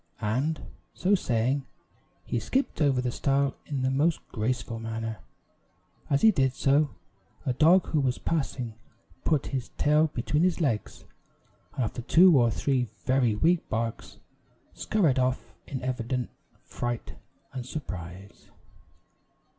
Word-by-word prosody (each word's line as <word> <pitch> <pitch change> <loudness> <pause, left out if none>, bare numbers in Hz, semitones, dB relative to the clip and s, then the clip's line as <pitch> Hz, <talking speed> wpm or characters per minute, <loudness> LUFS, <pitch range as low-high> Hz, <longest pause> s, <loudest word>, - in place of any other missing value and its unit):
And, 130 +10 -1 0.3
so 190 +3 +1
saying, 130 - +1 0.6
he 120 - -1
skipped 265 - -1
over 135 -4 +3
the 125 -1 -1
stile 140 +1 +1
in 140 -3 -2
the 130 - +1
most 150 +5 +1
graceful 115 0 -2
manner. 115 0 -4 0.9
As 140 - +1
he 220 - +8
did 135 -8 +1
so, 140 +3 +3 0.6
a 130 - +1
dog 165 +7 +5
who 155 - +1
was 130 -3 +1
passing 135 -7 -2 0.5
put 150 -4 +2
his 130 -3 -2
tail 150 +2 +4
between 150 +2 -1
his 180 0 +2
legs, 125 -10 -2 0.7
and 130 - 0
after 115 +2 -3
two 170 +7 +6
or 120 -3 +5
three 125 +3 0 0.2
very 130 -4 +2
weak 165 +10 +2
barks, 115 0 -3 0.6
scurried 165 -12 +1
off 130 0 -1
in 130 -2 -5
evident 125 0 -2 0.3
fright 120 -1 -4 0.4
and 130 -2 -4
surprise. 95 - -8
130 Hz, 130 wpm, -27 LUFS, 120-150 Hz, 0.9 s, he